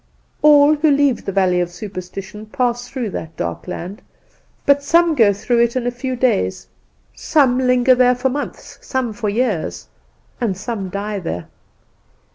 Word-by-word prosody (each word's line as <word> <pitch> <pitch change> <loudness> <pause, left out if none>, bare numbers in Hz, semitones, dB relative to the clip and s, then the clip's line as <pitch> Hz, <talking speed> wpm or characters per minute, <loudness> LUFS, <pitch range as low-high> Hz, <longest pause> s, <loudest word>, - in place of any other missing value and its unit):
"All 295 0 +6
who 305 +1 +2
leave 280 -4 +2
the 195 - -2
valley 185 -2 +2
of 175 - -2
superstition 195 +3 -8
pass 245 +1 -1
through 245 -6 -4
that 160 -2 -7
dark 85 0 -4
land; 185 +5 -6 0.6
but 285 0 +4
some 335 +3 +3
go 225 -8 +4
through 220 +4 0
it 235 +1 +1
in 255 -2 -1
a 245 - 0
few 255 +1 -4
days, 235 - 0 0.5
some 270 -5 +2
linger 250 0 +4
there 250 0 +4
for 255 +2 0
months, 285 +3 -6
some 255 -4 -2
for 215 -1 -3
years, 200 - -2 0.5
and 210 -7 -1
some 205 -2 -4
die 200 +2 -4
there." 90 - -5
235 Hz, 160 wpm, -19 LUFS, 195-260 Hz, 0.6 s, All